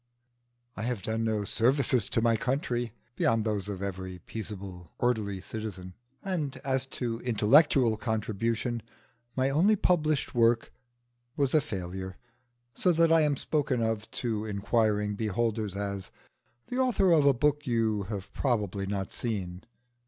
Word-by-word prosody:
I - - -5
have 115 -4 -2
done 110 +1 -1
no 110 -2 0
services 125 +3 +2
to 115 - +1
my 115 -1 +4
country 120 -1 -1 0.2
beyond 115 -1 +2
those 105 -2 -1
of 100 -1 -4
every 95 -1 -5
peaceable 95 -5 -7
orderly 105 -6 0
citizen; 95 -4 -6 0.3
and 155 -8 -2
as 135 -1 0
to 115 -2 -2
intellectual 120 +1 +4
contribution, 115 +1 -1 0.5
my 130 +1 +1
only 185 +10 +4
published 155 -6 +1
work 115 -1 +3 0.6
was 140 -2 +1
a 155 - +5
failure, 95 -3 -5 0.6
so 180 - +2
that 165 0 +4
I 165 0 +6
am 145 -2 +2
spoken 130 -6 0
of 110 -1 -2
to 110 -3 -1
inquiring 105 0 +1
beholders 110 -1 -1
as 100 -1 -4 0.6
"the 250 - -3
author 235 -8 +3
of 160 -3 +5
a 140 - +6
book 150 +3 +1
you 110 -3 +1
have 100 -3 -6
probably 105 -7 -1
not 100 -1 -3
seen." 95 -6 -4
115 Hz, 140 wpm, -29 LUFS, 100-135 Hz, 0.6 s, I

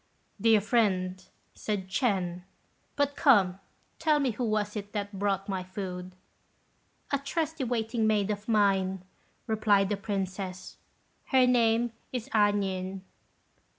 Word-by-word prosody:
"Dear 225 -2 +5
friend," 185 -4 +1 0.3
said 205 -3 -3
Ch'ên; 190 -5 0 0.5
"but, 285 0 +1
come, 195 -9 +4 0.4
tell 310 -2 +3
me 270 -3 +1
who 235 +3 -4
was 215 -1 -1
it 205 -1 -6
that 205 -2 -4
brought 195 -1 0
my 190 -2 -2
food." 185 -1 -6 1.0
"A 280 - +1
trusty 310 +1 -2
waiting 225 -1 0
maid 210 -1 +2
of 205 0 -5
mine," 195 -4 +2 0.4
replied 210 -3 +2
the 205 - 0
Princess; 190 -2 -4 0.5
"her 260 -2 +4
name 235 -1 +3 0.2
is 245 -3 -5
A 205 -2 +5
nien." 190 -1 -3
205 Hz, 125 wpm, -29 LUFS, 190-230 Hz, 1.0 s, Dear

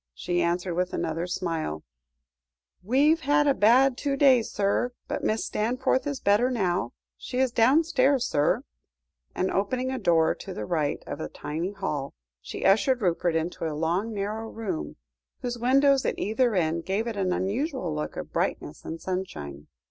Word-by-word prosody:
she 175 - -1
answered 175 +1 0
with 180 +1 -1
another 165 +1 -2
smile 165 - -3 1.0
"We've 280 - +3
had 295 -1 +2
a 280 - +4
bad 250 +4 +4
two 280 -1 -1
days, 260 -5 +5
sir, 205 +5 0
but - - -3
Mrs. 220 +1 0
Stanforth 255 +5 0
is 285 -2 -3
better 210 +5 +3
now. 180 - -1 0.2
She 250 - -6
is 260 -1 +2
downstairs, 270 +1 +3
sir," 165 - +1 0.7
and, 185 - 0
opening 255 +6 -1
a 260 - -3
door 165 -2 +3
on - - -4
the 105 - -4
right 155 0 -1
of - - -6
the - - -4
tiny 165 +6 -4
hall, 150 - -4 0.3
she - - -6
ushered 220 +5 +3
Rupert 175 -1 +1
into 165 0 -2
a 150 -2 -4
long 175 +8 0
narrow 215 +2 -3
room, 195 - -4 0.5
whose 240 -1 -3
windows 275 +2 +4
at - - -1
either 225 +2 +1
end 165 -1 0
gave 195 +5 -1
it 230 -2 -3
an 190 -2 0
unusual 205 - -1
look 150 0 -4
of - - -7
brightness - - -2
and 165 - -6
sunshine. 75 - -5
200 Hz, 165 wpm, -26 LUFS, 170-255 Hz, 1.0 s, days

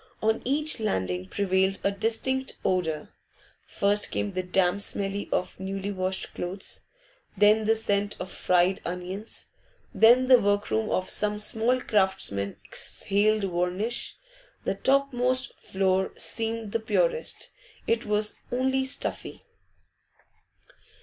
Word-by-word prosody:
On 220 +1 +1
each 295 +2 0
landing 95 - -1
prevailed 190 - +1
a 200 - +2
distinct 245 +6 -1
odour; 160 -5 0 0.6
first 205 +1 +1
came 205 - -2
the 185 - -1
damp 185 +1 +1
smell 200 0 -2
of 180 - -2
newly 195 +1 -4
washed 190 -1 -2
clothes, 185 +2 -4 0.5
then 210 +2 +5
the 225 +1 +4
scent 205 -2 -1
of 185 - -6
fried 180 +1 +2
onions, 180 +5 -5 0.4
then 240 +3 +6
the 255 -1 +7
workroom 205 +1 0
of 185 - 0
some 210 0 0
small 225 +4 +1
craftsman 190 - 0
exhaled 210 +1 +1
varnish. 185 +5 -1 0.5
The - - 0
topmost 255 -2 +1
floor 190 0 0
seemed 225 -2 -2
the 230 - 0
purest; 485 - 0 0.3
it 230 0 +1
was 210 0 0
only 265 +2 +1
stuffy. 265 - -2
205 Hz, 115 wpm, -27 LUFS, 190-230 Hz, 0.6 s, the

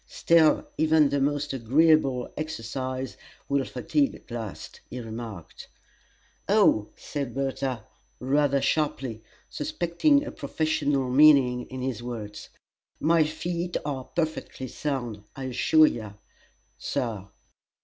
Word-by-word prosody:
"Still, 165 -2 +3
even 155 -2 +4
the 140 0 0
most 145 0 0
agreeable 135 0 +3
exercise 130 -2 -4 0.3
will 140 -1 +1
fatigue 280 - 0
at - - -17
last," 115 -5 -7
he 125 - -6
remarked. 110 -6 -8 0.8
"Oh," 195 - +4
said 140 -5 -5
Bertha, 135 -4 -2 0.3
rather 140 +1 +2
sharply, 135 -8 -1 0.3
suspecting 290 - +1
a - - -5
professional 145 -5 -1
meaning 130 -3 +5
in 130 -1 -6
his 130 -3 -3
words, 110 -4 -7 0.5
"my 165 +1 +4
feet 170 +3 -3
are 135 -3 -3
perfectly 160 -5 -3
sound, 120 -7 -4
I 135 - -6
assure 130 +5 +4
you, 110 -8 -3 0.6
Sir!" 110 -6 -3
135 Hz, 110 wpm, -26 LUFS, 125-155 Hz, 0.8 s, meaning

